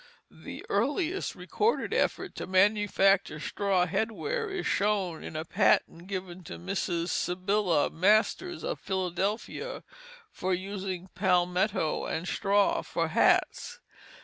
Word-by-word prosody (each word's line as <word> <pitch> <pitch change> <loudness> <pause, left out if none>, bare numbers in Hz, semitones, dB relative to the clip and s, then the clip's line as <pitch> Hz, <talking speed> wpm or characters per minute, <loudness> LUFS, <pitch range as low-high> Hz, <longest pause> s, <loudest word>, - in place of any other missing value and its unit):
The - - -9
earliest 300 - 0
recorded 445 +3 0
effort - - 0
to - - -5
manufacture 195 -2 +3
straw 190 +3 +1
head 220 +6 -1
wear 445 - -3
is 390 -2 -4
shown 195 -5 0
in - - -8
a 155 +1 -3
patent 170 +1 +2
given 185 -2 -5
to 85 - -7
Mrs. 170 - -2
Sibylla 185 -3 +1
Masters 215 - +2
of - - -3
Philadelphia, 190 +3 -3 0.5
for 185 0 -1
using 190 -1 -5
palmetto 180 -1 +1
and 165 +3 -3
straw 200 +1 +2
for - - -2
hats. - - +2
190 Hz, 120 wpm, -29 LUFS, 180-210 Hz, 0.5 s, manufacture